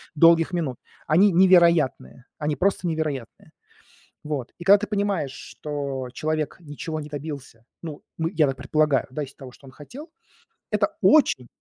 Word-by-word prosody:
долгих 165 +2 +5
минут. 150 -8 -2 0.3
Они 185 +7 +5
невероятные, 170 -8 +3 0.2
они 150 0 -1
просто 190 -1 0
невероятные. 155 -7 -4 0.7
Вот, 145 -5 -4
и 175 - -9
когда 200 +2 +7
ты 210 - -5
понимаешь, 200 -9 -1 0.2
что 140 -4 -5
человек 155 +1 -2
ничего 155 0 -6
не 150 - -8
добился, 140 -6 -8 0.2
ну, 155 -3 -7 0.2
мы 165 +1 -1
я 155 -3 +4
так 135 - -3
предполагаю, 145 +1 +1
да, 150 +3 -4
из 135 - -14
того, 130 -2 -11
что 135 - -18
он - - -12
хотел- 265 - -11 0.6
это - - +2
очень 205 - +4
155 Hz, 155 wpm, -24 LUFS, 140-170 Hz, 0.7 s, когда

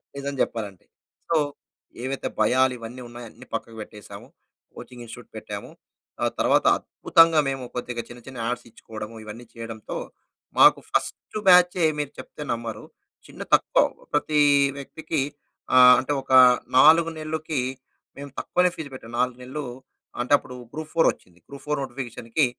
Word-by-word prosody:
నిజం 140 0 -4
చెప్పాలంటే. 105 -5 -3 0.4
సో, 165 - +2 0.7
ఏవైతే 135 +1 -3
భయాలు 130 0 +3
ఇవన్నీ 120 +2 -9
ఉన్నాయో 120 0 -10
అన్ని - - -15
పక్కకు 115 0 -5
పెట్టేసాము. 105 -1 -11 0.5
కోచింగ్ 125 -1 -11
ఇన్‌స్టిట్యూట్ 115 - -11
పెట్టాము. - - -7 0.5
ఆ - - +3
తర్వాత - - +3
అద్భుతంగా 165 -1 +4
మేము 135 -1 -4
కొద్దిగా 125 -1 -4
చిన్న, 120 - -11
చిన్న 130 -2 -9
యాడ్స్ 125 +1 -3
ఇచ్చుకోవడము, 110 0 -9
ఇవన్నీ 110 +3 -9
చేయడంతో 115 -2 -7 0.6
మాకు - - +8
ఫస్ట్ - - -2
బ్యాచే 180 -1 +6 0.2
మీరు 145 -1 -3
చెప్తే - - -10
నమ్మరు. 115 -1 -6 0.4
చిన్న - - -12
తక్కువ - - +2 0.3
ప్రతి 150 +1 +1 0.4
వ్యక్తికి 155 +1 -4 0.5
ఆహ్, 125 0 +9
అంటే 135 +3 -2
ఒక 135 - -11 0.5
4 160 +4 +7
నెల్లు‌కి 155 -2 -3 0.6
మేము 140 -1 -8
తక్కువనే 180 0 +2
ఫీజ్ 155 -3 -7
పెట్టాం. 115 -3 -10
4 125 0 0
నెల్లు 145 +4 -5 0.6
అంటేప్పుడు 125 0 +1 0.2
గ్రూప్-4 155 +1 +1
ఒచ్చింది. 90 -1 -24
గ్రూప్-4 150 +1 -4
నోటిఫికేషన్‌కి 125 0 -2
130 Hz, 135 wpm, -24 LUFS, 115-150 Hz, 0.7 s, ఆహ్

